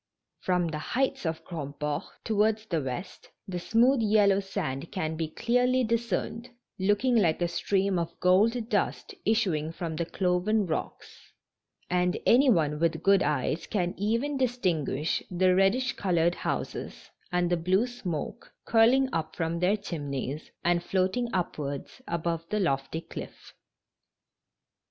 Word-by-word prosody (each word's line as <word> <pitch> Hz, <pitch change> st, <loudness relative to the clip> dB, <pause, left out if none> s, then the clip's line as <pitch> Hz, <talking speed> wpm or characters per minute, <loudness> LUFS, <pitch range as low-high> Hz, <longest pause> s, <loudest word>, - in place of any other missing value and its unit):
From 180 Hz, -2 st, +1 dB
the 155 Hz, -1 st, -4 dB
heights 255 Hz, -, -1 dB
of 160 Hz, 0 st, -4 dB
Grandport, 150 Hz, 0 st, -4 dB, 0.2 s
towards 215 Hz, 0 st, +1 dB
the 170 Hz, -7 st, -1 dB
west, 135 Hz, +8 st, -6 dB, 0.2 s
the 180 Hz, -2 st, -3 dB
smooth 235 Hz, +7 st, +3 dB
yellow 205 Hz, -2 st, +4 dB
sand 170 Hz, -7 st, -4 dB
can 160 Hz, -5 st, -2 dB
be 160 Hz, 0 st, -2 dB
clearly 250 Hz, +8 st, +1 dB
discerned, 230 Hz, +1 st, -2 dB, 0.3 s
looking 205 Hz, +6 st, +2 dB
like 175 Hz, -8 st, +3 dB
a 175 Hz, -, +1 dB
stream 190 Hz, +2 st, 0 dB
of 170 Hz, 0 st, -5 dB
gold 220 Hz, +6 st, +3 dB
dust 425 Hz, -, -1 dB
issuing 180 Hz, -9 st, +1 dB
from 165 Hz, -1 st, -5 dB
the 170 Hz, 0 st, -2 dB
cloven 190 Hz, +4 st, +1 dB
rocks, 160 Hz, -, -6 dB, 0.6 s
and 180 Hz, 0 st, +1 dB
any 265 Hz, +3 st, +6 dB
one 150 Hz, -8 st, +2 dB
with 165 Hz, 0 st, 0 dB
good 195 Hz, -1 st, +5 dB
eyes 150 Hz, +2 st, -1 dB
can 180 Hz, -4 st, -1 dB
even 230 Hz, +8 st, 0 dB
distinguish 175 Hz, -, 0 dB
the 185 Hz, 0 st, +3 dB
reddish 195 Hz, +7 st, +2 dB
colored 175 Hz, -3 st, +1 dB
houses -, -, -4 dB, 0.2 s
and 180 Hz, 0 st, +1 dB
the -, -, +4 dB
blue 185 Hz, +6 st, +2 dB
smoke 210 Hz, -11 st, -5 dB
curling 240 Hz, +4 st, +5 dB, 0.3 s
from 165 Hz, 0 st, -1 dB
their 185 Hz, +4 st, +2 dB
chimneys 145 Hz, -6 st, -5 dB, 0.2 s
and 175 Hz, 0 st, +3 dB
floating 190 Hz, +7 st, 0 dB
upwards 150 Hz, -, -3 dB
above 170 Hz, -1 st, -2 dB
the 210 Hz, -, 0 dB
lofty 140 Hz, -2 st, -1 dB
clifi*. -, -, -9 dB
180 Hz, 135 wpm, -28 LUFS, 165-220 Hz, 0.6 s, any